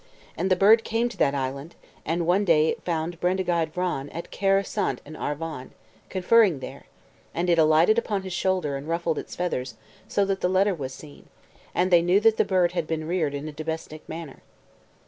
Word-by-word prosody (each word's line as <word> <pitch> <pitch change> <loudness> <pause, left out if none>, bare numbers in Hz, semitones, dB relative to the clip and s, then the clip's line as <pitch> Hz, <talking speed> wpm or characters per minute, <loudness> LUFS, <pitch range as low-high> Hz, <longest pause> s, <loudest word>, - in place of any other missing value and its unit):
And 185 +3 -1
the 185 - +4
bird 215 +5 +5
came 230 +2 0
to 235 - -11
that 140 - +2
island; 140 +4 -4 0.3
and 165 +2 0
one 180 +4 +3
day 160 -4 +4
it - - -3
found 165 0 -3
Bendigeid 175 -3 0
Vran 175 -6 -2
at 170 - -7
Caer 195 0 +2
Seiont - - -2
in 155 +2 -10
Arvon, 150 -3 -5 0.4
conferring 190 -3 +3
there, 130 - -9 0.5
and 175 +1 +1
it 170 - +3
alighted 160 +8 +5
upon 205 -4 -3
his 190 -1 -6
shoulder, 180 -6 0
and 140 +2 -9
ruffled 165 -2 -1
its - - -8
feathers, 130 -9 -3 0.3
so 200 - +1
that 195 -1 -2
the 180 - +1
letter 190 +2 +3
was 135 -6 -5
seen, 145 +2 -13 0.5
and 185 +1 +1
they 175 -1 +6
knew 175 +3 +3
that 220 +1 +3
the - - +4
bird 180 -2 +2
had 170 -3 -2
been 155 -1 -3
reared 160 -5 0
in 140 +2 -5
a - - -5
domestic 155 0 -6
manner. 160 -4 -8
170 Hz, 200 wpm, -25 LUFS, 155-185 Hz, 0.5 s, they